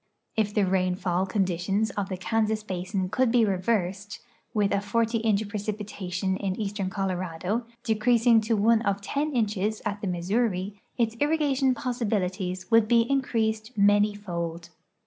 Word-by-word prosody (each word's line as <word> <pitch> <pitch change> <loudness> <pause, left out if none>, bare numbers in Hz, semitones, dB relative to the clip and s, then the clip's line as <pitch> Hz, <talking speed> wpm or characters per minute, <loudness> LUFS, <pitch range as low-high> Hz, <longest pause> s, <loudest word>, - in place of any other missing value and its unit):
If 210 -2 0
tbe 205 -3 +3
rain 185 -1 +2
tall 185 0 0
conditions 195 +2 0
of 200 -2 -3
the 185 - -3
Kansas 220 +2 0
basin 185 -1 -3
could 255 +2 +2
be 235 -2 +4
reversed, 195 0 -1 0.3
with 205 -2 +1
a 200 - +1
forty 230 +3 0
iuch 220 -1 +1
preci]ntation 200 -3 -3
in 190 -2 -2
eastern 200 -2 -2
Colorado, 190 +3 -2 0.2
decreasing 230 0 +4
to 220 0 0
one 220 +2 +4
of 200 -3 0
ten 285 +9 -1
inches 215 -2 0
at 205 -1 -2
the 200 - -2
Missouri, 190 +2 -1 0.2
its 230 -2 +1
irrigation 290 -4 +2
possibilities 200 -8 -2
would 225 -1 +5
be 235 +1 +5
in 275 +4 +1
creased 220 -1 -2
many 205 +1 +4
fold. 170 -4 -5
205 Hz, 150 wpm, -26 LUFS, 190-225 Hz, 0.3 s, would